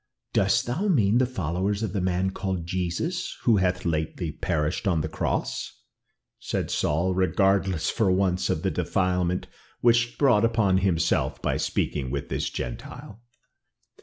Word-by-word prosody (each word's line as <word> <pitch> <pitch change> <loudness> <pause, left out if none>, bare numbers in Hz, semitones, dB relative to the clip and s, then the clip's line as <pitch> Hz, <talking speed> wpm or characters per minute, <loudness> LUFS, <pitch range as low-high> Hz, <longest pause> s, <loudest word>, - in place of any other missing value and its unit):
"Dost 100 +5 +2
thou 150 +13 -1
mean 120 - +3
the 130 - +3
followers 100 - -2
of 105 - -2
the 100 - -1
man 95 +1 0
called 95 -3 -3
Jesus, 95 - -2
who 115 -4 +4
hath 90 -1 0
lately 80 0 -2
perished 80 +5 -1
on 85 -5 +2
the 80 - -2
cross?" 80 - -3 0.6
said - - -3
Saul, 85 +5 +1
regardless 95 -1 +2
for 110 -5 +2
once 90 -1 +1
of - - -1
the - - +1
defilement 90 -1 0 0.4
which 120 -1 +5
he 120 0 -5
brought 120 -7 +4
upon 110 -5 +3
himself 85 -4 +1
by - - -1
speaking 70 -4 -1
with 70 +2 -4
this - - -1
Gentile. 100 - -7
95 Hz, 150 wpm, -26 LUFS, 85-105 Hz, 0.6 s, which